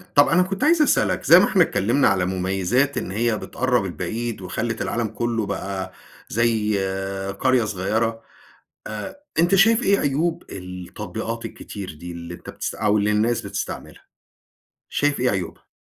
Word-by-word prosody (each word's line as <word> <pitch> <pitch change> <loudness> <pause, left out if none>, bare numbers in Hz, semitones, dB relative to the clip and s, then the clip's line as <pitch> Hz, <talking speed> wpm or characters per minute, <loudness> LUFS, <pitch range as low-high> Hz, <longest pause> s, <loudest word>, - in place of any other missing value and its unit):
طَب 145 0 +7
أنا 180 - +4
كنت 195 +1 -3
عايز 315 +1 +5
أسألك، 300 - +2
زي - - +9
ما - - +5
إحنا 185 -3 +4
اتكلمنا 120 0 +2
على 90 -1 +2
مميزات 95 +9 0
إن 95 - -3
هي 115 +1 +1
بتقرّب 125 -5 0
البعيد، 110 +6 -4
وخلّت 110 +5 -3
العالم 115 -2 -1
كُلّه 115 -1 -2
بقى 95 -1 -4 0.4
زي 110 -2 +1 0.6
قرية 130 -2 +3
صغيرة، 110 +3 -1 0.7
آآ، 110 - -6 0.2
أنت 175 +4 +4
شايف 225 +5 +5
إيه 200 0 +3
عيوب 155 +5 0
التطبيقات 90 -1 -6
الكتير 95 -5 -7
دي؟ 85 +3 -9
اللي 85 0 -7
أنت - - -10
بتست - - -4
أو 105 0 +2
اللي 105 +1 +2
الناس 115 +3 +1
بتستعملها؟ 100 0 -6 0.9
شايف 145 -2 +1
إيه 125 - +2
عيوبها؟ 95 -5 -4
110 Hz, 150 wpm, -23 LUFS, 95-135 Hz, 0.9 s, زي